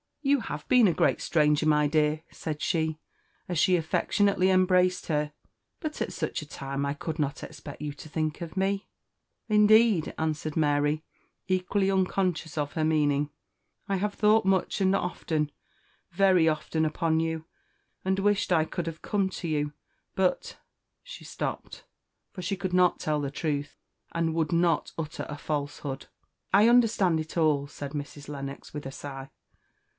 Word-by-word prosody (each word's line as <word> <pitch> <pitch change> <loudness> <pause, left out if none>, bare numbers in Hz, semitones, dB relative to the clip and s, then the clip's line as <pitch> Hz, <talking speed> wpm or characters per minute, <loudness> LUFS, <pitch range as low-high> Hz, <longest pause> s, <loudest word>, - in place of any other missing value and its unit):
"You 280 0 +3
have 150 -6 -6
been 250 -4 +6
a 175 - +3
great - - +2
stranger, 150 -1 +2
my 150 -1 +4
dear!" 155 +1 +1
said 155 -2 -5
she, 160 -2 0 0.5
as 175 -3 -1
she 185 +3 +4
affectionately 185 +3 +2
embraced 185 -1 +3
her; 150 -1 -1 0.5
"but 310 -3 -5
at - - -2
such - - -3
a - - -8
time 140 0 -4
I 140 - -1
could 160 +2 -5
not 145 -2 -2
expect 145 - -9
you 150 -1 -3
to 155 +2 -11
think 155 +1 -2
of 170 -1 -6
me." 195 +1 0 0.6
"Indeed," 215 -4 +5
answered 155 -1 -2
Mary, 145 0 +1 0.4
equally 190 +1 +1
unconscious 185 -3 0
of 145 -1 -1
her 160 - -1
meaning, 150 -2 +2 0.6
"I 195 -1 0
have 205 +2 -1
thought 215 +1 +4
much 190 +1 +1
and 190 0 +3
often, 160 -5 -1 0.6
very 185 -2 +4
often, 160 0 0
upon 160 +1 +1
you, 160 -1 -2 0.6
and 190 0 +1
wished 205 -1 +1
I 160 -3 +4
could 170 +1 -4
have 165 -1 -6
come 200 -2 0
to 175 - -5
you; 150 -2 -1 0.4
but 190 -1 0 0.2
" - - -55
she - - -10
stopped, - - -5 0.5
for 185 - -7
she 185 +3 -1
could 185 -1 -3
not 180 -1 +4
tell 150 -1 0
the 140 -1 -3
truth, 145 -1 -2 0.4
and 165 -1 0
would 160 -2 0
not 170 0 +2
utter 155 0 -4
a 150 - -5
falsehood. 145 -2 -4 0.5
"I 205 +3 +7
understand 225 -8 +4
it 155 +2 -6
all," 150 -3 +2
said 140 -1 -7
Mrs. 145 -1 -6
Lennox, 140 -1 -7
with 150 -2 -6
a 135 - -5
sigh. 135 -1 -8
160 Hz, 165 wpm, -28 LUFS, 150-190 Hz, 0.6 s, I